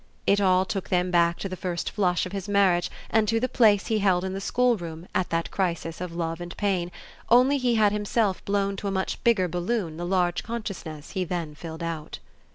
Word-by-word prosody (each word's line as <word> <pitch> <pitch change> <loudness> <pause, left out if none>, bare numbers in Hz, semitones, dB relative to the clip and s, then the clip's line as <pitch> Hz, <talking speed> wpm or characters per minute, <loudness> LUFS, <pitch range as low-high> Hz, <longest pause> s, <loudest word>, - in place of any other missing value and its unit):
It 200 +1 +3
all 185 -1 +4
took 195 -1 -4
them 180 0 +1
back 170 -1 +3
to - - -4
the 185 - -5
first 180 -2 -3
flush 180 -4 +1
of 185 - -7
his 195 0 -5
marriage 190 -4 +3 0.2
and 220 -1 +3
to 225 +2 +2
the 255 - 0
place 215 -6 +4
he 220 -2 0
held 185 -3 +2
in 190 0 -3
the 195 - -4
schoolroom 190 -9 0
at 185 - 0
that 165 0 -1
crisis 170 -3 -2
of 175 -2 -5
love 165 0 -3
and 175 0 -7
pain; 185 -4 0 0.4
only 255 +4 +5
he 245 -2 +2
had 210 -2 +4
himself 210 -1 0
blown 200 0 0
to 200 - -4
a - - -1
much 190 -1 -2
bigger 215 -6 +3
balloon 175 -1 -2
the 175 - -4
large 180 -2 +1
consciousness 195 -10 -6
he 190 -1 -1
then 170 -3 -3
filled 160 +2 -8
out. 165 -2 -5
185 Hz, 215 wpm, -26 LUFS, 175-205 Hz, 0.4 s, only